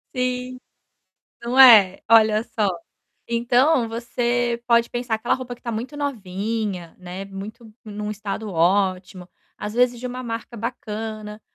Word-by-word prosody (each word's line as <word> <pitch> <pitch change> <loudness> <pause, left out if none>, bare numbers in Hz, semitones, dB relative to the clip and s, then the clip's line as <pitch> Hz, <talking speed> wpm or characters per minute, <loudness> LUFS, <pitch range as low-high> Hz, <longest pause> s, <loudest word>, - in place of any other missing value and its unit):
Sim, 250 0 -2 0.8
não 240 +2 -2
é? 215 -8 +8
Olha 220 -1 +5
só. 225 -3 -1 0.6
Então, 245 +2 +2
você 240 0 -1
pode 235 -1 +4
pensar, 240 -2 -1
aquela 220 +2 0
roupa 250 -2 -5
que - - -27
tá 235 - -4
muito 245 +7 -5
novinha, 210 - -3
né, 180 +2 -7
muito 210 +3 -10
num 210 -1 -5
estado 210 +1 -5
ótimo, 185 +1 0 0.3
às 210 0 -5
vezes 245 0 +2
de 250 - -7
uma 250 0 -5
marca 230 0 -6
bacana, 215 -2 -6
230 Hz, 135 wpm, -22 LUFS, 210-245 Hz, 0.8 s, é